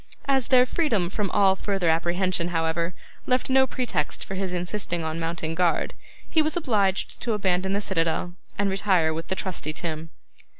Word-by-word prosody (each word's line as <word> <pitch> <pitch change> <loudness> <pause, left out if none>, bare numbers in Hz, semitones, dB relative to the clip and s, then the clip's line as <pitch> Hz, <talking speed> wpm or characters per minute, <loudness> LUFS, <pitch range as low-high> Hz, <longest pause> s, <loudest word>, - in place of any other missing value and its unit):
As 270 -2 +2
their 255 -1 +6
freedom 225 - 0
from 205 -1 -1
all 195 0 +4
further 195 -2 -1
apprehension, 175 +2 +1
however, 170 0 -1 0.3
left 255 +1 +1
no 265 0 +5
pretext 235 - -2
for - - -6
his 190 -1 -2
insisting 180 -1 -1
on 160 +1 -3
mounting 165 -1 -3
guard, 175 0 +1 0.3
he 320 - +3
was 310 +2 0
obliged 205 - 0
to 235 - 0
abandon 190 -2 +1
the 200 - 0
citadel, 175 -2 0 0.2
and 200 - +1
to - - -1
retire 185 -5 +2
with 165 +1 -5
the 190 - -1
trusty 175 -5 -3
Tim. 160 0 -3
185 Hz, 175 wpm, -25 LUFS, 170-210 Hz, 0.3 s, their